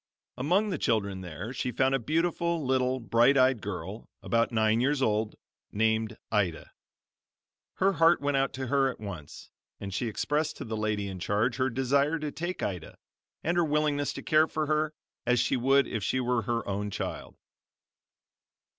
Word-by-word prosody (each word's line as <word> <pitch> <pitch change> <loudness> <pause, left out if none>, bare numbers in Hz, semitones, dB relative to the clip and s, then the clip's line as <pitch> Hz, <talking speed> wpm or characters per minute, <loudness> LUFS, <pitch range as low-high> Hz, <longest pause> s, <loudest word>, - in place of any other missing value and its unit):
Among 180 +12 +1
the 170 - -2
children 100 -4 0
there 90 - -6
she 125 -1 -2
found 130 +3 +2
a 135 - +2
beautiful, 165 +3 0
little, 130 0 +1
bright 120 +3 +4
eyed 130 -3 +4
girl, 100 +2 -6
about 115 0 +1
nine 110 0 +2
years 140 +2 +2
old, 110 -4 0 0.4
named 110 0 0
Ida. 95 -7 0 1.0
Her 195 +1 +2
heart 165 -1 +5
went 145 0 0
out 135 0 +1
to 130 -1 -4
her 135 +1 +2
at - - -7
once 100 -9 -8 0.3
and 100 -1 -6
she 120 - -1
expressed 150 +7 -1
to - - -6
the 110 -1 -4
lady 105 -2 -1
in 95 -1 -6
charge 110 +7 0
her 130 0 +1
desire 140 +5 +1
to 150 -2 -4
take 175 +4 -4
Ida, 90 -5 -4 0.5
and 170 +1 0
her 175 - +4
willingness 150 -2 +1
to - - -7
care 155 +1 +4
for 155 -1 -2
her 155 0 0 0.3
as 125 0 +3
she 120 +2 +2
would 135 +2 +4
if 110 -4 -4
she 130 - 0
were 125 -1 +1
her 115 +2 -2
own 100 +1 -2
child. 100 - -5
125 Hz, 175 wpm, -28 LUFS, 110-145 Hz, 1.0 s, heart